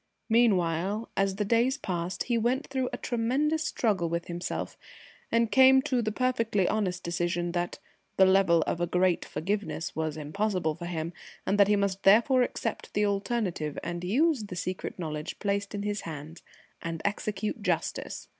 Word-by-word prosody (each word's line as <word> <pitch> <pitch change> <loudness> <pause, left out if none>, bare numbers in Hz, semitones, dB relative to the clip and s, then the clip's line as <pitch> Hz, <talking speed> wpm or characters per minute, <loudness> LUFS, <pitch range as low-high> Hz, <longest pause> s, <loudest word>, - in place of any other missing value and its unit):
Meanwhile, 200 -2 +2
as 195 -1 +1
the 210 +1 -1
days 235 +5 +2
passed, 175 -1 -3
he 240 - 0
went 245 +5 +1
through 260 -2 -2
a - - -4
tremendous 275 +7 0
struggle 205 - 0
with 170 0 -2
himself, 175 +1 -4 0.6
and 230 -1 +2
came 265 0 +7
to 260 -4 +1
the 215 -1 -1
perfectly 230 -5 +1
honest 185 -4 -1
decision 175 0 -1
that 175 0 -2 0.4
the 190 - +7
"level 190 -4 +4
of 170 - -2
a 175 - +1
great 180 0 +2
forgiveness" 195 -2 -3
was 160 -1 -2
impossible 170 +2 -1
for 170 +2 -7
him, 165 -1 -3 0.3
and 200 +2 +1
that 200 - +7
he 210 - +4
must 200 -1 0
therefore 235 +6 +5
accept 235 -2 -3
the 210 +1 +3
alternative 200 - -1
and 175 +1 -4
use 260 - +2
the 185 - -7
secret 185 +1 -4
knowledge 155 -2 -4
placed 200 0 -2
in 200 - -3
his 205 0 -2
hands 155 +1 -8 0.4
and 165 -1 -5
execute 210 +1 -2
justice. 180 -5 -2
195 Hz, 165 wpm, -28 LUFS, 175-230 Hz, 0.6 s, came